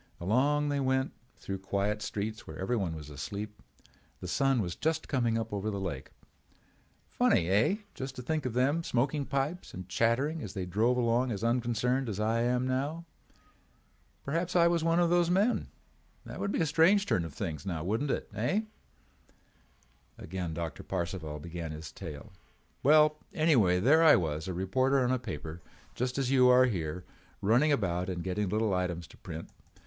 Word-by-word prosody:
Along 140 +10 +2
they 145 -1 0
went 130 0 +1 0.3
through 95 -1 -5
quiet 100 +2 -1
streets 105 +1 -4
where 80 - -8
everyone 95 -4 -1
was 75 -1 -9
asleep. 100 +9 -6 0.6
The 90 - -6
sun 135 +6 +2
was 90 -5 -2
just 160 0 -1
coming 120 -4 +1
up 115 -1 -4
over 100 +1 -2
the 100 -2 -3
lake. 95 -2 -4 1.0
Funny, 85 - +2
eh—just 135 - 0
to 125 - -7
think 155 0 -1
of 120 - -4
them 140 +7 +2
smoking 140 +2 0
pipes 140 +6 -2
and 90 0 -7
chattering 130 - +1
as 105 - -6
they 95 -2 -2
drove 110 +7 +1
along 120 +1 +2
as 100 -1 -4
unconcerned 120 +2 +1
as 105 -1 -4
I 110 +2 +1
am 125 +1 +1
now. 145 +6 -2 1.2
Perhaps 165 +5 -2
I 170 -1 +6
was 170 -1 +1
one 165 +1 +3
of 175 -1 +3
those 175 -1 +3
men. 200 +7 +2 0.6
That - - -8
would 200 - -1
be - - 0
a - - +3
strange 165 +6 +4
turn 90 - +1
of 80 -3 -8
things, 75 -2 -4
now 85 -5 -3
wouldn't 110 - -1
it, - - -1
eh?" 120 - 0 1.6
Again 90 -2 -5
Doctor 85 -1 -4
Parcival 85 -3 -4
began 85 +1 -6
his 75 -2 -7
tale: 80 +2 -9 0.5
"Well, 150 +1 +5 0.2
anyway 120 - +4
there 145 - +5
I 160 -2 +8
was, 80 -1 -1
a 95 - -3
reporter 130 +9 +2
on 125 - +1
a 130 - +1
paper 85 - -6 0.3
just 125 +1 -2
as 135 -2 0
you 130 -2 +6
are 125 +1 +7
here, 90 -6 -3 0.4
running 120 +9 +3
about 90 -8 0
and 90 -2 -3
getting 95 +1 -1
little 110 0 +1
items 90 -2 -1
to - - -16
print. 80 +1 -8
115 Hz, 175 wpm, -30 LUFS, 90-140 Hz, 1.6 s, I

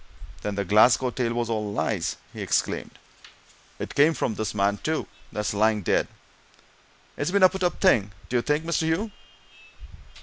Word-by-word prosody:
"Then 105 -1 -3
the 100 0 -2
Glasgow 120 +6 +4
tale 120 -1 -1
was 120 -1 -1
all 105 -2 -2
lies?" 105 -4 -1 0.2
he - - -7
exclaimed. - - -1 0.8
"It - - -6
came 155 +3 +4
from - - -1
this 110 0 -3
man, 100 0 +1
too, 160 0 -2 0.2
that's 105 -2 -2
lying 105 0 +2
dead - - +1 1.1
it's 145 - -2
been 200 +1 +2
a 185 - +9
put 190 0 -6
up 180 -1 0
thing, 105 - +3 0.2
d'ye 120 -1 +1
think, 150 +4 0
Mr. 170 0 0
Hugh?" 195 +7 -1
115 Hz, 165 wpm, -25 LUFS, 105-160 Hz, 1.1 s, a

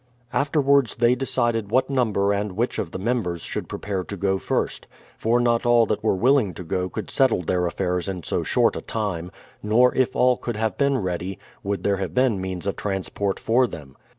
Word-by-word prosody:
Afterwards 140 -3 +2
they 120 +1 +4
decided 120 -4 0
what 130 +3 +2
number 105 -6 +2
and 100 -1 -2
which 115 +6 -1
of 85 - -2
the - - -6
members 95 -5 -1
should - - -4
prepare 100 -3 -3
to 100 - -6
go 95 +1 0
first; - - -2 0.3
for 115 +2 +1
not 120 -1 +2
all 120 -1 +5
that 105 - -2
were 110 - +2
willing 115 - +2
to 90 - -7
go 90 +2 -2
could - - -6
settle 130 -9 +2
their 90 +1 0
affairs 90 +1 -2
in 90 -3 -5
so - - -1
short - - +2
a - - -4
time; 95 -6 -3 0.3
nor 120 +4 +4
if 130 -2 +1
all 125 -1 +4
could 120 - -4
have 110 -2 -1
been 140 -1 +2
ready, 90 -2 -3 0.2
would 100 -2 -3
there 100 -1 +1
have 90 -3 -4
been 125 -7 +2
means 95 -1 -4
of 100 - -2
transport 95 0 -2
for 125 +3 +3
them. 70 - -10
105 Hz, 205 wpm, -23 LUFS, 95-120 Hz, 0.3 s, all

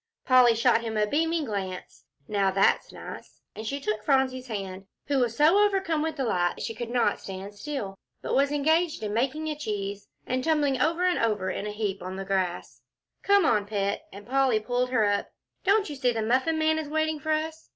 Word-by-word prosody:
Polly 250 -3 +6
shot 230 0 +3
him 225 -2 -3
a 210 - +3
beaming 320 +6 0
glance. 190 -5 -5 0.2
"Now 200 -2 +1
that's 195 +1 +2
nice," - - -10 0.2
and 220 0 -6
she 280 +3 -2
took 215 -5 -2
Phronsie's 260 -2 +1
hand, 195 -3 -6 0.2
who 280 -1 +1
was 235 -2 0
so 320 +7 +5
overcome 385 -6 +1
with 320 0 -2
delight 180 - 0
she 225 - -3
could 230 +1 -6
not 240 -4 +1
stand 195 +1 -7
still, 205 -4 -5 0.2
but - - -4
was 280 +1 +3
engaged 315 +1 +1
in 210 -1 -2
making 270 +7 -1
a 305 - -2
cheese, 205 -7 -4 0.2
and 255 +1 -1
tumbling 290 -5 +1
over 335 +5 +2 0.5
in 205 - -4
a - - -3
heap 210 -2 -3
on 185 +1 -5
the 195 0 -5
grass. 190 -2 -2 0.4
"Come 400 -3 +4
on, 210 -8 +2
Pet," 200 -1 -2
and 200 +1 -11
Polly 265 -3 +2
pulled 245 +3 -1
her 240 -4 +2
up, 205 0 0 0.4
"don't 405 +1 +3
you 295 - -6
see 255 -2 +1
the 225 -2 -2
Muffin 260 +8 +1
Man 315 0 +2
is 305 -2 -5
waiting 315 0 0
for 315 - -6
us?" 315 +1 -3
250 Hz, 200 wpm, -27 LUFS, 205-305 Hz, 0.5 s, Polly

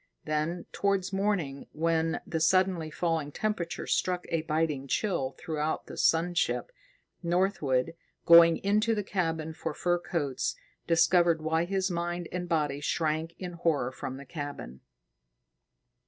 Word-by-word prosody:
Then, 155 +3 -1
towards 200 -1 0
morning, 195 -9 -1
when 165 0 0
the 160 - -2
suddenly 180 -1 +2
falling 160 -2 -1
temperature 195 -2 -2
struck 180 -1 0
a 165 -1 0
biting 155 -3 -1
chill 155 -5 -1
throughout 155 -1 -2
the - - -9
sun 170 +2 +2
ship, 180 - 0 0.5
Northwood, 170 -6 +1 0.3
going 170 0 +8
into 215 +3 +2
the 210 - -1
cabin 165 -5 -2
for 160 -1 -5
fur 175 0 +1
coats, 145 -7 -2 0.3
discovered 170 0 +4
why 160 +1 +1
his 190 +1 -1
mind 175 0 -2
and 180 -1 -4
body 150 -4 0
shrank 160 +2 -1
in 180 -2 -5
horror 160 -7 0
from 130 0 -6
the 140 - -10
cabin. 145 - -7
165 Hz, 135 wpm, -29 LUFS, 155-180 Hz, 0.5 s, going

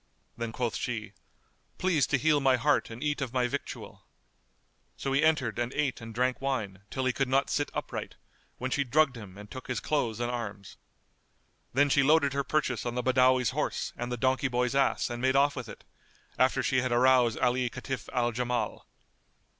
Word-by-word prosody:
Then 115 -1 -4
quoth 120 -1 -2
she, 110 -4 -4 0.6
"Please 175 -7 +2
to 140 - +2
heal 150 +1 +3
my 135 -2 +4
heart 120 - +1
and 115 +4 -7
eat 145 -1 -1
of 130 -3 -3
my 125 -1 +2
victual," 140 +3 -6 0.9
So 135 - -2
he 140 - +3
entered 135 -8 +2
and 120 +1 -1
ate 140 -5 -1
and 115 0 -8
drank 125 +3 0
wine, 110 -9 -2
till 130 -1 -2
he 130 - +2
could 135 +1 0
not 135 +2 +1
sit 145 - 0
upright, - - -5 0.4
when 130 +1 -3
she 140 - +1
drugged 140 +1 +2
him 100 -5 -10
and 105 0 -11
took 130 - -8
his 125 - -2
clothes 120 -7 -1
and 120 0 -1
arms. 100 -5 -6 0.9
Then 145 +3 +3
she 140 - +5
loaded 140 0 +4
her 140 0 0
purchase 135 -3 0
on 120 0 -3
the 125 - -1
Badawi's 130 -1 +3
horse - - -2
and 120 0 -5
the 125 - -2
donkey 130 +3 +1
boy's 125 0 0
ass 135 -1 +2
and 120 0 -4
made 130 +1 +2
off 140 +1 +4
with 125 -4 -6
it, - - -11 0.6
after 130 0 +3
she 130 -1 +2
had 130 -1 -2
aroused 125 -1 +4
Ali 125 0 +1
Kitf 130 +1 -6
al 120 -2 +1
Jamal. 120 -2 -2
130 Hz, 195 wpm, -29 LUFS, 120-135 Hz, 0.9 s, she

